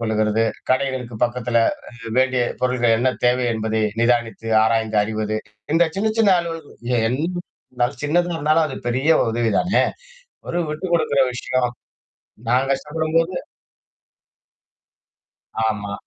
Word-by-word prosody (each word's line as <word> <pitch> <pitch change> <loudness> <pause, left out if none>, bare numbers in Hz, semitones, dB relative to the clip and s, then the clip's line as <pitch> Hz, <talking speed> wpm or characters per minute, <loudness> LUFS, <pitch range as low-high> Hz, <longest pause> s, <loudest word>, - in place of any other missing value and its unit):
கொள்ளுகிறது. 110 0 +1 0.3
கடைகளுக்கு 130 -2 0
பக்கத்தில 120 -1 0 0.3
அ - - -18 0.3
வேண்டிய 130 -1 +3 0.2
பொருட்கள் 120 -2 +2
என்ன 130 +2 +2 0.2
தேவை 125 +1 +2
என்பதை 110 0 -1 0.2
நிதானித்து, 115 -1 0 0.2
ஆராய்ந்து 110 -1 +1
அறிவது, 110 0 -2 0.4
இந்த 170 +1 +5
சின்ன, 215 +3 +1
சின்ன 215 -3 +5
அலுவல்கள் 165 -3 -7 0.3
என்ன 130 +4 -1 0.5
இருந்தாலும், 125 +1 -1
சின்னதா 175 +4 +1
இருந்தாலும் 155 +1 +2
அது 140 - -6
பெரிய 130 +6 +1 0.2
உதவிதானே! 115 - +2 0.7
ஒரு 175 - -1
விட்டு 155 +4 -4
குடுக்குற 145 -5 +3
விஷயம். 125 0 -1 0.8
நான் 130 +3 +2
கஷ்டப்படும்போது 160 +5 0 2.3
ஆமா. 105 -2 -3
125 Hz, 110 wpm, -21 LUFS, 115-150 Hz, 2.3 s, இந்த